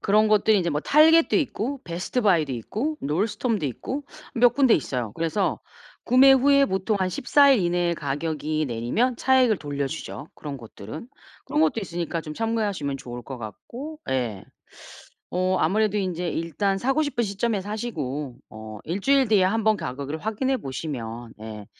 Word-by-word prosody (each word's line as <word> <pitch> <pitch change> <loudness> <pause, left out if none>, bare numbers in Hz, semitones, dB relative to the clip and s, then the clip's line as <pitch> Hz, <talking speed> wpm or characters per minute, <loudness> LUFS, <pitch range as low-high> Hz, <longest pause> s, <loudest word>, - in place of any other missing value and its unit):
그런 215 +1 +3
것들이 215 0 +4
인제 170 -2 0
뭐 150 +1 -1
target도 320 - +5
있고 270 - -2
베스트바이도 175 - +1
있고 220 - -3
놀스톰도 205 - -1
있고 265 - -5 0.3
몇 245 +1 +5
군데 265 -5 +5
있어요. 125 -7 -2
그래서 165 +5 -1 0.4
구매 265 +2 +7
후에 280 +1 +5
보통 190 -2 0
한 185 -1 +1
14일 270 +4 +4
이내에 175 0 +1
가격이 155 +1 -2
내리면 125 - 0
차액을 255 -6 +3
돌려주죠, 145 0 -5
그런 145 -2 -7
것들은. 115 - -9 0.4
그런 300 - 0
것도 250 -7 +2
있으니까 170 -3 -3
좀 155 - -7
참고하시면 205 -10 -1
좋을 125 -3 -8
것 130 +2 -7
같고. 245 - -8
예. 120 -7 -1 0.9
어 185 +1 +1
아무래도 210 +5 +2
인제 180 -3 -2
일단 170 +5 -1
사고 270 +8 +1
싶은 275 -5 -1
시점에 205 +1 -1
사시고 150 - -4
어 110 0 -9
1주일 255 - +2
뒤에 205 -4 +4
한번 220 +2 +2
가격을 140 0 -5
확인해 225 +7 -1
보시면 120 - -6
예 110 -2 -8
185 Hz, 345 characters per minute, -24 LUFS, 145-235 Hz, 0.9 s, 구매